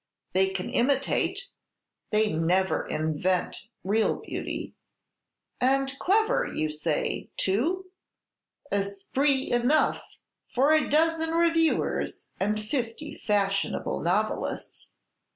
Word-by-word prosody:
They 190 +1 +4
can 190 -1 -3
imitate, 280 - +1 0.6
they 215 -2 +2
never 180 +4 +1
invent 175 +6 -1 0.2
real 215 +3 +2
beauty." - - -5 0.9
"And 270 +1 +2
clever, 435 +4 +3
you 155 0 -1
say, 150 0 -2
too?" 315 - +1 0.9
"Esprit 205 +8 0
enough 245 +6 +3 0.5
for 270 +4 +2
a 310 - +3
dozen 325 +1 +2
reviewers 330 -1 +1
and 210 +2 +1
fifty 235 +5 -3
fashionable 195 -1 0
novelists." 200 +6 -2
220 Hz, 90 wpm, -27 LUFS, 190-300 Hz, 0.9 s, They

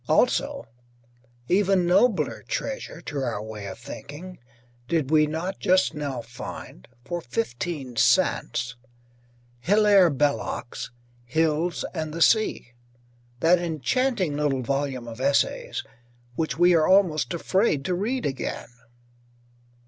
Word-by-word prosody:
Also, - - +2 0.8
even 195 -1 +3
nobler 190 +5 +2
treasure - - -4
to 145 - -5
our 120 -6 -2
way 105 -2 -7
of 95 - -7
thinking, 180 +6 -9 0.5
did 155 -4 0
we 155 -1 +5
not 170 +5 -4
just 185 -1 +3
now 140 -5 -4
find 120 - -9 0.2
(for 175 +4 -3
fifteen 120 +3 -4
cents) 120 - +2 0.8
Hilaire 200 - +5
Belloc's 145 -4 -2 0.3
"Hills 160 +5 0
and 155 0 -4
the 165 - -4
Sea," 215 - +2 0.7
that 175 +2 +5
enchanting 175 - 0
little 145 -3 0
volume 135 -2 -2
of 115 +2 -8
essays, 140 +1 0 0.5
which 155 0 -2
we 175 +1 +5
are 160 -2 +4
almost 185 -5 +3
afraid 170 -4 +1
to 185 - 0
read 235 +8 -1
again. 135 -2 -3
155 Hz, 115 wpm, -25 LUFS, 130-180 Hz, 0.8 s, we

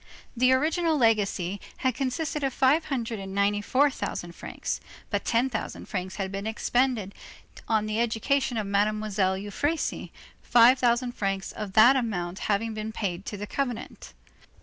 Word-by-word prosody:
The 255 +2 +4
original 315 +4 +2
legacy 205 -5 +1 0.2
had 260 -1 0
consisted 280 +4 -2
of 270 -2 -1
five 285 +5 +3
hundred 235 -5 -3
and 195 0 -7
ninety 205 +1 +2
four 275 +7 +3
thousand 175 -8 -4
francs; - - -5 0.3
but - - 0
ten 235 +3 +2
thousand 230 -4 -5
francs 185 -2 -4
had 190 -2 -3
been 200 +2 -4
expended 230 -2 0 0.5
on 220 -1 +2
the 215 +1 -2
education 235 +2 0
of 215 - -1
Mademoiselle 200 -1 +1
Euphrasie, 245 +11 -2 0.3
five 245 +2 +6
thousand 245 0 +2
francs 195 -4 -2
of 210 -3 -6
that 235 +6 +7
amount 195 -7 -2
having 220 +2 +1
been 215 0 -4
paid 195 -4 -4
to 205 - -4
the 205 - -5
convent. 245 0 -4
220 Hz, 155 wpm, -27 LUFS, 200-255 Hz, 0.5 s, that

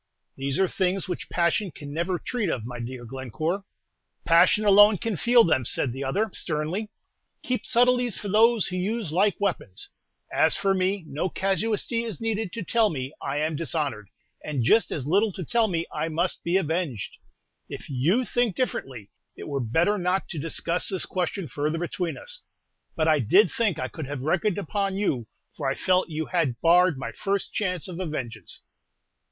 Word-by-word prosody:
"These 135 0 -2
are 190 - +3
things 190 +1 0
which 180 - -5
passion 175 +4 +1
can 145 -3 -9
never 175 +3 -1
treat 225 0 -2
of, 120 -7 -2
my 120 0 -6
dear 120 +1 -6
Glencore." 135 - -3 0.6
"Passion 170 +5 +5
alone 205 +1 +7
can 225 +3 -2
feel 235 +7 +5
them," 130 - +2
said 120 +1 0
the 135 +2 -5
other, 200 +11 0
sternly. 165 +7 -2 0.5
"Keep 250 -1 -2
subtleties 245 -2 +3
for 205 - -6
those 220 +1 +4
who 185 - -3
use 200 -1 -2
like 195 +5 +2
weapons. 180 - -2 0.4
As - - +4
for 195 -1 +1
me, 190 0 0
no 155 +6 -2
casuistry 210 +5 0
is 225 -6 -5
needed 225 -3 -2
to 230 - -4
tell 225 +3 +3
me 135 -3 -4
I 140 +1 -2
am 155 0 0
dishonored, 145 - -2 0.3
and 145 -5 -2
just 220 - +4
as 135 - -2
little 200 +8 +2
to 180 - -6
tell 235 +3 +2
me 170 -4 -1
I 150 +1 -1
must 170 +3 -1
be 170 +3 +2
avenged! 160 - -2 0.5
If - - -7
you 160 - +1
think 235 -3 0
differently, 130 - -3 0.3
it - - -8
were 140 -2 -2
better 165 - +1
not 180 +2 0
to 165 - -4
discuss 165 +3 -1
this 190 -2 -2
question 185 -1 -2
further 150 +5 -2
between 175 0 -3
us; - - -5 0.5
but 160 -1 +1
I 155 -2 +4
did 180 - +4
think 230 - 0
I 130 - -2
could 140 +3 -7
have 145 -2 -5
reckoned 175 +7 +1
upon 195 +1 -1
you, 135 - -1 0.3
for - - -1
I 135 - -1
felt 185 -1 +2
you 160 0 -3
had 150 -10 0
barred 175 -1 +4
my 130 - -5
first 200 -1 -2
chance 185 -6 -1
of 180 -1 -7
a 185 - -2
vengeance." 120 - -6
175 Hz, 185 wpm, -26 LUFS, 145-205 Hz, 0.6 s, alone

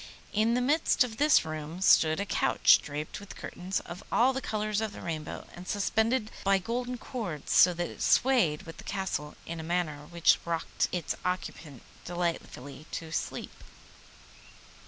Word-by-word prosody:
In 220 +3 +3
the 250 - +1
midst 290 +1 +3
of 225 -3 -6
this 295 - +5
room 155 +2 -5
stood 160 -4 +5
a 200 - -1
couch, 185 - +4
draped 150 +1 -5
with 205 - -11
curtains 185 +2 -4
of 175 +2 -9
all 255 +3 +4
the 265 - -3
colours 215 -2 -1
of 220 -2 -3
the - - -9
rainbow, 155 -3 -5
and 180 +1 -10
suspended 220 +3 +1
by 195 0 +4
golden 245 +6 -3
cords 200 - -5
so 180 - +7
that 175 0 -2
it - - -10
swayed 235 - +3
with 165 - -10
the - - -10
Castle 190 -7 -3
in 170 0 -5
a - - -5
manner 160 -3 -2
which 170 0 +3
rocked 170 -1 -1
its 175 -4 -2
occupant 170 -6 -4 0.2
delightfully 165 -5 -4
to 160 -1 -6
sleep. - - -4
180 Hz, 165 wpm, -29 LUFS, 160-220 Hz, 0.2 s, so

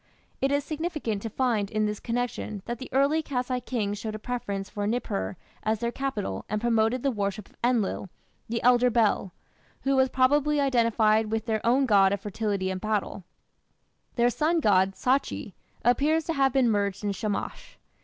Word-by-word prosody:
It 270 +1 +2
is 285 0 +1
significant 305 - -3
to 225 - -4
find 220 -4 0
in 215 0 0
this 210 0 -2
connection 230 -4 -3
that 240 -1 -4
the 260 - -8
early 280 +4 +3
Kassite 250 -4 -3
kings 210 -5 -2
showed 215 -1 -4
a - - -3
preference 205 -4 -4
for 205 -1 -3
Nippur 100 - -2 0.2
as 220 +1 0
their 235 0 -1
capital 230 - -3
and 215 - -1
promoted 230 +1 +1
the 275 - +2
worship 205 -2 -3
of - - -25
Enlil, 230 -6 0 0.4
the 230 0 -2
elder 250 0 +5
Bel, 220 -5 +1 0.5
who 275 0 +2
was 265 0 +4
probably 290 +4 +3
identified 230 -5 +3
with 225 0 -1
their 220 -2 -1
own 255 +4 +3
god 200 -4 +5
of 200 - -1
fertility 200 -2 -2
and 185 0 -4
battle. 210 -3 -2 0.9
Their 240 0 +3
sun 320 +6 +1
god, 195 -6 +3
Sachi, 265 +2 -1 0.3
appears 290 +7 +3
to 330 - -2
have 270 -2 +3
been 250 -3 +3
merged 200 -1 -1
in 205 - 0
Shamash. 205 +1 -4
230 Hz, 175 wpm, -27 LUFS, 205-260 Hz, 0.9 s, elder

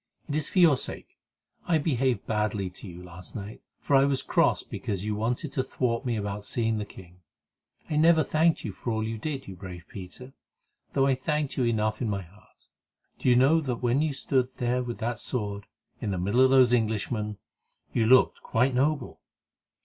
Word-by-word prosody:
It 145 - -4
is 150 0 -1
for - - -5
your 165 -6 +6
sake. - - -6 0.5
I 170 - +4
behaved 135 -5 0
badly 105 -3 -1
to 90 - -10
you 90 0 -9
last 90 +3 -10
night, 105 -1 -7 0.2
for 140 - +1
I 135 - +6
was 140 -1 +1
cross - - +2
because 100 -1 -4
you 105 - -1
wanted 120 +7 -2
to 130 - 0
thwart 120 -2 -1
me 120 - 0
about 105 -1 -3
seeing 115 0 -1
the 105 - -3
king. 90 -2 -14 0.7
I 150 - -1
never 160 0 +5
thanked 160 +3 +2
you 105 - -3
for 110 - -6
all 110 0 -1
you 110 0 -3
did, 140 0 -4
you 95 - -7
brave 90 -2 -9
Peter, 100 +8 -10 0.6
though 135 -1 +3
I 135 - +4
thanked 150 +2 -1
you 130 - +1
enough 110 -1 0
in 115 - 0
my 100 -2 -2
heart. 95 +5 -22 0.5
Do - - +1
you 125 - +6
know 140 +6 +5
that 125 -5 -3
when 125 +4 +2
you 155 -1 +1
stood 130 -2 0
there 125 +1 0
with 120 -1 -5
that 120 0 -3
sword, 100 -5 -4 0.3
in - - -2
the 95 - -1
middle 100 +8 +2
of 130 - +6
those 130 -2 +5
Englishmen, 110 -2 0 0.6
you 110 -2 +2
looked 130 +2 +5
quite 125 +3 +1
noble? 140 +1 0
120 Hz, 200 wpm, -27 LUFS, 105-135 Hz, 0.7 s, your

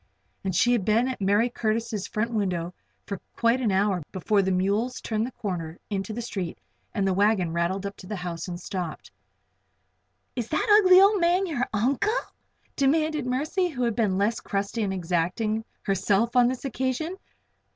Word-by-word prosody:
And 190 -2 -2
she 240 +7 +4
had 235 -5 +2
been 225 +5 +2
in 260 - -2
Mercy 205 +5 +2
Curtis' 220 -3 -1
front 220 +2 -2
window 180 -5 -1 0.3
for 200 -2 -5
quite 235 +2 +2
an 225 -5 +1
hour 190 -1 +2
before 200 +2 +1
the 190 - 0
mules 200 +7 0
turned 220 +1 -1
the - - -8
corner 175 -7 -4
into 195 +1 -2
the 235 +2 -4
street 190 -7 -4 0.3
and 195 -2 0
the 190 - +2
wagon 195 -3 +2
rattled 175 +4 -1
up 200 0 -4
to 185 - -11
the 210 - -4
house 175 -2 -5
and 175 -1 -5
stopped. 180 -3 -5 1.2
"And 245 - -1
is 230 - -16
that 420 -2 +5
ugly 370 0 +8
old 400 0 +5
man 355 +3 +3
your 280 -8 -1
uncle?" 255 - +1 0.6
demanded 305 0 +1
Mercy, 310 +9 0
who 260 -7 -3
had 235 -3 0
been 210 -5 +1
less 210 +3 +1
crusty 200 +3 -2
and 200 -2 0
exacting 185 +5 -1 0.2
herself 200 +4 +1
on 245 -1 +6
this 255 +2 -3
occasion. 265 +6 -2
215 Hz, 180 wpm, -26 LUFS, 190-250 Hz, 1.2 s, ugly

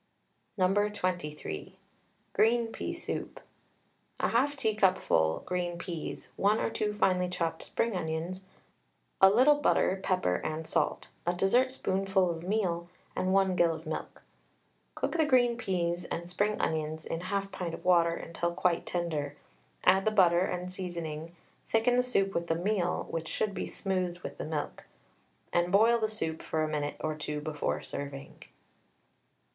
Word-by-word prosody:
No. 185 0 +3 0.2
23. 175 - -4 0.6
GREEN 230 +1 +3
PEA - - -4
SOUP. - - -5 0.8
1/2 275 +5 +2
teacupful 190 - +2
green 175 -1 -2
peas, 170 -2 -6
1 205 +2 +3
or - - 0
2 210 -1 -1
finely 185 -3 +2
chopped 165 -2 -2
spring 230 -3 -1
onions, 165 +2 -3 0.8
a 190 - +10
little 255 +9 +6
butter, 190 -8 +3
pepper 185 - +1
and 155 +1 -4
salt, - - -1 0.2
a 175 - +3
dessertspoonful 195 -3 +2
of 165 -1 -5
meal, 175 -3 -1 0.3
and 185 - 0
1 190 -1 +3
gill 170 -2 +3
of - - -10
milk. - - -5 0.7
Cook - - -1
the 315 - +5
green 245 -4 +4
peas 180 -6 -1
and 170 +1 -4
spring 205 +4 0
onions 155 0 -1
in 165 - -3
1/2 195 +2 -2
pint 170 -3 -4
of - - -13
water 170 -2 +4
until 170 +1 -3
quite 175 -1 +1
tender. 160 -5 -2 0.5
Add 190 +1 +5
the - - +5
butter 180 -5 +5
and 180 0 -2
seasoning, 170 -3 -5 0.3
thicken 230 +2 +3
the - - +6
soup 195 -6 +1
with 170 0 -1
the 165 - +1
meal 180 +1 0
(which 165 -1 -3
should 210 +4 -1
be - - -3
smoothed 185 -3 -2
with - - -7
the - - -3
milk), 150 -2 -4 0.7
and 175 +1 +2
boil 225 +4 +5
the 220 - +1
soup 160 -7 -3
for 155 -1 -1
a - - +1
minute 150 -1 -2
or 155 0 -1
two 150 0 -4
before 150 -1 -2
serving. 140 -1 -7
180 Hz, 150 wpm, -30 LUFS, 165-200 Hz, 0.8 s, a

